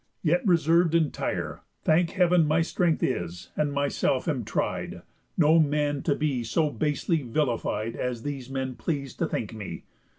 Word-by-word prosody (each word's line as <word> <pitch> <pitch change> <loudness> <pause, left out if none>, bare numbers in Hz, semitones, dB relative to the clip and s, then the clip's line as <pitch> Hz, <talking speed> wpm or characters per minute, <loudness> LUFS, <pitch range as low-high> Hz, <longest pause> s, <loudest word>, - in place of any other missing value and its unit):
Yet 175 +1 +2
reserv'd 170 -1 +4
entire, 160 -3 -1 0.2
Thank 165 +2 +3
Heav'n, 180 -3 +4
my 160 +2 +3
strength 170 -1 0
is, 90 -7 -3
and 150 -1 0
myself 140 -1 0
am 140 -7 0
tried, - - -3 0.3
No 160 +2 +5
man 145 -2 +1
to 145 - +1
be 140 -5 -1
so 155 +5 +1
basely 155 +2 0
vilified 115 -4 -1
As 125 -2 -3
these 140 -3 -5
men 130 -1 -3
pleas'd 140 -2 -4
to - - +1
think - - -3
me. - - -7
150 Hz, 155 wpm, -27 LUFS, 130-165 Hz, 0.3 s, No